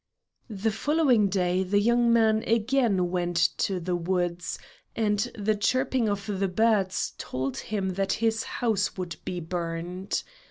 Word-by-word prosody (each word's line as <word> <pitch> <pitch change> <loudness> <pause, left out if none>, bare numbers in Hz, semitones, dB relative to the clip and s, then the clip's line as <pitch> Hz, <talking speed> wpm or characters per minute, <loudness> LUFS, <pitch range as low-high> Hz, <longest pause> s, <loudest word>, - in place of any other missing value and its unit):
The 215 +1 -1
following 260 -3 +3
day 180 -1 +1
the 195 +2 +2
young 235 +2 +3
man 220 -1 +3
again 225 -5 +2
went 175 -1 -1 0.2
to 190 -2 0
the 180 +1 -2
woods, 175 0 -1 0.4
and 210 -2 +1 0.2
the 215 +1 +1
chirping 255 +2 +1
of 200 0 -2
the 200 -2 -1
birds 200 -1 +1
told 130 0 -3
him 200 -3 -2
that 190 +1 0
his 225 0 +1
house 215 -6 -1
would 175 -4 -5
be 180 - -3
burned. 175 +2 -3
200 Hz, 145 wpm, -27 LUFS, 180-225 Hz, 0.4 s, following